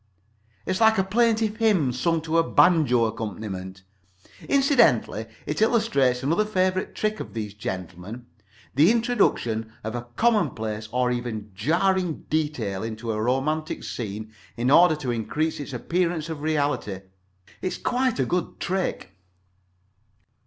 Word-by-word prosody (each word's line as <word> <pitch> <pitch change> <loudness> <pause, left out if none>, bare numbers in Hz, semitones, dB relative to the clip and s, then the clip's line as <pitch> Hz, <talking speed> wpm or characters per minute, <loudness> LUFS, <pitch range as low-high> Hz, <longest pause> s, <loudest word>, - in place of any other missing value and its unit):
It - - -1
is 185 - -1
like 220 0 +5
a 190 - +3
plaintive 220 +1 +1
hymn 205 - +3
sung 165 +6 0
to 165 +1 +1
a - - +4
banjo 150 -10 +4
accompaniment. 100 -4 -5 0.7
Incidentally 280 -1 +3 0.2
it - - -3
illustrates 140 - +2
another 165 +9 +2
favorite 185 -3 0
trick 215 0 -1
of - - -8
these 105 -2 -4
gentlemen—the 105 - -3
introduction 200 - +1
of 110 0 -4
a 120 0 -5
commonplace 110 - 0
or 125 0 +1
even 115 -4 -4
jarring 170 - 0
detail 145 -11 -1
into 115 +1 -4
a 110 0 -2
romantic 145 +6 -1
scene 110 -1 -6 0.2
in 125 +3 +1
order 170 +1 +7
to 135 -5 -3
increase 150 +8 -2
its 145 -1 -6
appearance 170 +4 -1
of 155 -3 -5
reality. 145 -8 0
It 95 +1 -9 0.6
is 185 - -2
quite 255 -1 0
a 130 - +1
good 175 +5 -2
trick. 180 - -2
145 Hz, 135 wpm, -25 LUFS, 110-185 Hz, 0.7 s, order